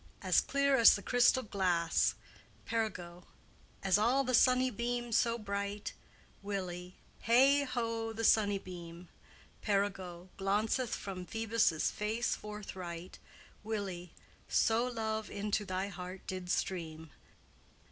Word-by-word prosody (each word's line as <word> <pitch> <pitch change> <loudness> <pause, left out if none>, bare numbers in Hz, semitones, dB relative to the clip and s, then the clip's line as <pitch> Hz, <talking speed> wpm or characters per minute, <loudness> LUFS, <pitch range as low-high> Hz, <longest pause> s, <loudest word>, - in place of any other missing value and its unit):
As - - +4
clear 280 0 +2
as 230 - +8
the 200 - -6
crystal 245 +1 +4
glasse. 180 -6 +1 0.5
P. 230 - -5
All 180 -6 -3 0.6
as 195 -2 +3
the 255 +4 +2
sunny 255 +1 +4
beame 240 +1 -3
so 230 +1 +2
bright, 200 -1 -4 0.5
W. 185 -3 -5 0.3
Hey, 270 +5 +5
ho, 230 -3 -2
the 225 +1 -5
sunnebeame! 180 -5 0 0.5
P. 210 - -3
Glaunceth 195 +4 -1
from 185 -2 -6
Phoebus' 225 -7 +1
face 220 +3 -1
forthright, 185 -4 -8 0.4
W. 200 -5 -4 0.4
So 230 +2 +2
love 220 -3 -3
into 205 +1 -2
thy 185 +1 -2
heart 180 0 -8
did 185 -1 -5
streame." 160 -4 -3
205 Hz, 110 wpm, -33 LUFS, 185-230 Hz, 0.6 s, as